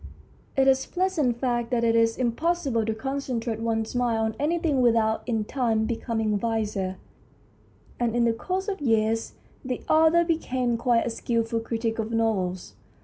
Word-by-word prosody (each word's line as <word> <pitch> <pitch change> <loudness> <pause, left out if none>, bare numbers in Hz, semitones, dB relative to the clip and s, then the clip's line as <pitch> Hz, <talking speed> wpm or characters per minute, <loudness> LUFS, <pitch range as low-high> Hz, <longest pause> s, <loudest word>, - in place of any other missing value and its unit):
It 270 0 +4
is 265 0 +4
a - - -23
pleasant 350 -10 0
fact 240 -2 -1
that 240 -2 0
it 230 0 +3
is 230 0 +3
impossible 260 0 0
to 220 - 0
concentrate 245 -3 -3
one's 225 -1 -1
mind 245 -2 +1
on 220 0 -1
anything 305 -2 +1
without 225 -2 +3
in 225 -3 0
time 225 -3 0
becoming 225 -2 -1
wiser, 210 -4 -2 1.0
and 235 -1 0
in 240 -1 +3
the 230 - +3
course 375 - -3
of 390 -6 -3
years 225 -3 +1 0.3
the 255 -2 -4
author 320 +2 +5
became 260 -7 0
quite 235 0 +2
a 235 - -2
skilful 230 0 -1
critic 225 0 -3
of 220 0 -2
novels. 200 -6 -1
235 Hz, 160 wpm, -26 LUFS, 225-265 Hz, 1.0 s, author